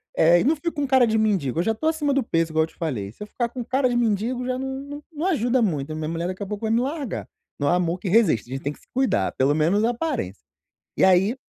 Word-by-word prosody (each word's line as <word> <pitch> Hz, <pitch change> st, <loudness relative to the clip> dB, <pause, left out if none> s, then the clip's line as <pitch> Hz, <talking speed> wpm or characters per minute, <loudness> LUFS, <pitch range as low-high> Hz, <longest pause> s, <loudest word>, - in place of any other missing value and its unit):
eh, 170 Hz, +2 st, +5 dB
e -, -, +1 dB
não 305 Hz, +5 st, +3 dB
fico 335 Hz, +3 st, -3 dB
com 290 Hz, -1 st, -2 dB
cara 260 Hz, -2 st, +5 dB
de 220 Hz, -1 st, +1 dB
mendigo, 190 Hz, -, +1 dB
eu 170 Hz, -, +2 dB
já 225 Hz, -, +1 dB
tô 315 Hz, -, -2 dB
acima 300 Hz, -3 st, +1 dB
do 275 Hz, -, +1 dB
peso 165 Hz, -5 st, 0 dB
igual 160 Hz, 0 st, +3 dB
eu -, -, -3 dB
te -, -, -22 dB
falei, 120 Hz, -, -3 dB
se -, -, -23 dB
eu 210 Hz, -, -9 dB
ficar 235 Hz, +2 st, -2 dB
com 245 Hz, 0 st, -5 dB
cara 260 Hz, +2 st, +1 dB
de 245 Hz, -, -1 dB
mendigo 240 Hz, +2 st, 0 dB
já 255 Hz, 0 st, -1 dB
não 265 Hz, 0 st, -4 dB
não 290 Hz, +1 st, -8 dB
não 310 Hz, +2 st, -4 dB
ajuda 250 Hz, -, +2 dB
muito, 155 Hz, -6 st, -1 dB
minha 155 Hz, 0 st, -3 dB
mulher 170 Hz, +1 st, -2 dB
daqui 185 Hz, +2 st, -4 dB
a -, -, -4 dB
pouco 210 Hz, +1 st, -4 dB
vai 220 Hz, -, 0 dB
me 230 Hz, +1 st, +3 dB
largar, 275 Hz, -1 st, -4 dB, 0.3 s
não 145 Hz, -, 0 dB
há 175 Hz, -, +4 dB
amor 180 Hz, 0 st, 0 dB
que 185 Hz, -, -4 dB
resiste, 175 Hz, -, +3 dB
a -, -, -3 dB
gente 135 Hz, -, -5 dB
tem 145 Hz, -, -2 dB
que -, -, -20 dB
se -, -, -25 dB
cuidar, 250 Hz, -, +1 dB
pelo 135 Hz, +2 st, +2 dB
menos 165 Hz, +8 st, +2 dB
a 230 Hz, -, +3 dB
aparência. 240 Hz, -, -3 dB, 0.6 s
E -, -, 0 dB
aí, 190 Hz, +5 st, +4 dB
220 Hz, 290 wpm, -24 LUFS, 165-260 Hz, 0.6 s, eh